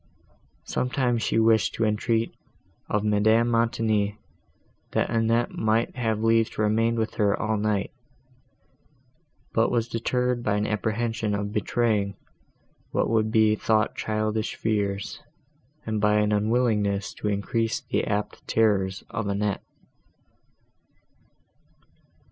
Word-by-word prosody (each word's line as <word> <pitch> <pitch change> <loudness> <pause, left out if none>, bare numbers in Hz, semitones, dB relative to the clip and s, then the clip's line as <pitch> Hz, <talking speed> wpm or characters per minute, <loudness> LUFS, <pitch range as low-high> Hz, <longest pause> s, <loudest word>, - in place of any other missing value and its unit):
Sometimes 125 -2 0
she - - 0
wished 110 -1 +3
to 115 - +1
entreat 110 +2 0 0.6
of 105 0 0
Madame 110 +2 +3
Montoni, 110 -3 +1 0.8
that - - 0
Annette 115 +1 +1
might 110 +2 0
have 110 -3 -1
leave 115 0 +3
to 110 - -1
remain 115 +2 +2
with 110 -1 -1
her 105 -2 +2
all 110 0 0
night, 105 -1 -1 1.6
but 115 - +3
was 115 -2 0
deterred 125 +1 -1
by 105 -3 0
an 105 0 0
apprehension 110 0 -1
of 100 0 -3
betraying 105 -2 0 0.7
what - - 0
would 110 -1 +2
be 110 -1 +4
thought 110 0 +1
childish 110 0 -2
fears, 100 -2 -2 0.6
and 110 -1 -2
by 105 0 +3
an 105 0 +2
unwillingness 105 -2 +1
to - - -5
increase 110 +3 -1
the - - -1
apt 105 +1 -3
terrors 100 -4 +1
of 110 -3 -3
Annette. 100 0 -1
110 Hz, 120 wpm, -25 LUFS, 105-115 Hz, 1.6 s, be